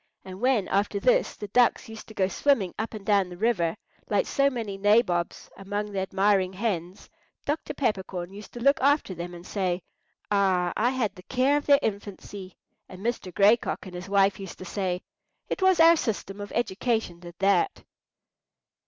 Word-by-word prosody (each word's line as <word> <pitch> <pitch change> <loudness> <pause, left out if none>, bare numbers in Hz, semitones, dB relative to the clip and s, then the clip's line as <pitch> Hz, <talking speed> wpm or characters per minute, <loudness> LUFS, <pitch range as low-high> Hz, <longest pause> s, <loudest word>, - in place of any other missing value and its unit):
And 190 +1 -9
when 250 -6 +2
after 200 +1 0
this 250 +5 +2
the 210 - -7
ducks 245 +3 +3
used 225 -1 -10
to 220 - -13
go 190 -2 +2
swimming 205 -4 +1
up 220 +1 -3
and 205 -2 -9
down 200 -3 +3
the 175 - -9
river 200 -4 +1 0.3
like 205 -2 +2
so 275 0 +2
many 225 -6 -4
nabobs 195 -4 +1
among 205 +1 -4
the 195 - -2
admiring 190 0 +1
hens, 190 -3 -3 0.4
Dr. 295 +2 -3
Peppercorn 190 -7 -2
used 205 +1 -10
to 240 - -7
look 275 +3 +3
after 285 -7 +2
them 175 0 -6
and 175 +1 -11
say, 185 -3 -2 0.5
"Ah, 185 -3 +2
I 235 +3 +2
had 250 -6 -1
the 185 - -13
care 260 +7 +1
of 290 - -2
their 285 -1 +7
infancy!" 200 -2 -5 0.3
and 185 0 -11
Mr. 230 -6 -2
Gray 205 +5 +5
Cock - - -5
and 185 - -9
his 180 +2 -7
wife 200 0 +3
used 195 -3 -8
to 185 - -9
say, 185 -1 -2 0.5
"It - - -3
was 375 -2 +4
our 330 +1 +8
system 205 -7 -3
of 205 - -7
education 220 -4 -1
did 175 -1 -11
that!" 195 -2 +1
200 Hz, 185 wpm, -26 LUFS, 185-235 Hz, 0.5 s, our